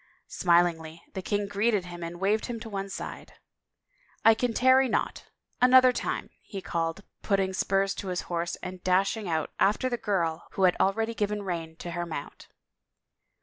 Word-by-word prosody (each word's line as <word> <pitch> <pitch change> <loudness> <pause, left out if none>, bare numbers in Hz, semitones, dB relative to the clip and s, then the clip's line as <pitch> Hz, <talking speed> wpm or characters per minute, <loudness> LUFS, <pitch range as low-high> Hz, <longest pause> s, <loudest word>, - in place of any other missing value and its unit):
Smilingly 170 -2 +1
the 190 - -4
king 205 +1 -1
greeted 205 -1 +1
him 175 -1 -8
and 170 +1 -6
waved 205 +3 +1
him 240 -2 -4
one 200 -3 -5
side. - - -7 0.5
" - - -36
I 225 - +9
can 245 +2 0
tarry 260 +2 +4
not - - -1 0.2
— - - -44
another 255 0 +7
time," - - -3
he 200 - -7
called, 165 -1 -2
and - - -35
putting 195 -2 +1
spurs 195 +1 +1
to 200 - -5
his 180 -1 -1
horse 170 0 -3 0.3
dashed 185 +3 +2
out 165 -8 -2
after 210 +6 +2
the 240 - -1
girl 170 -7 -1
who 190 - -1
had 180 -1 +5
already 225 +4 +1
given 210 -1 -2
rein 165 -4 -4
to 170 +1 -7
her 175 0 -3
mount. 150 -3 -7
195 Hz, 175 wpm, -28 LUFS, 175-220 Hz, 0.5 s, I